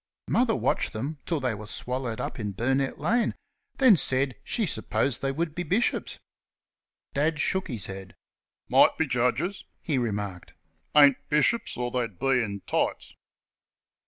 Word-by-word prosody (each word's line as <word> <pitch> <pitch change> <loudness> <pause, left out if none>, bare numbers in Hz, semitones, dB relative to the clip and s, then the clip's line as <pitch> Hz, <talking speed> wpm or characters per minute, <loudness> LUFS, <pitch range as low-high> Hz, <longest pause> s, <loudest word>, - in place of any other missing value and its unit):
Mother 235 -2 +2
watched - - 0
them 140 +7 -4
till 165 -3 0
they 130 -3 0
were 105 0 -8
swallowed 125 -1 -3
up - - -4
in 105 -2 -3
Burnett 135 +5 0
lane, 230 +11 +1 0.4
then 260 -6 +7
said 130 -3 +1
she 225 +7 0
supposed 115 - -1
they 135 - 0
would 160 +2 -2
be 175 - -3
bishops. 190 +8 0 1.0
Dad 150 +2 +1
shook 190 +5 0
his 115 - -4
head. 95 -1 -8 0.5
"Might - - +5
be 160 - +2
Judges," 130 +9 0 0.2
he 145 -6 -1
remarked; 105 -6 -4 0.4
"ain't 140 -3 +7
bishops, 155 +10 +2
or 120 0 -2
they'd 115 -7 -2
be 135 +4 +2
in 100 -2 -5
tights." - - -1
135 Hz, 150 wpm, -27 LUFS, 115-160 Hz, 1.0 s, then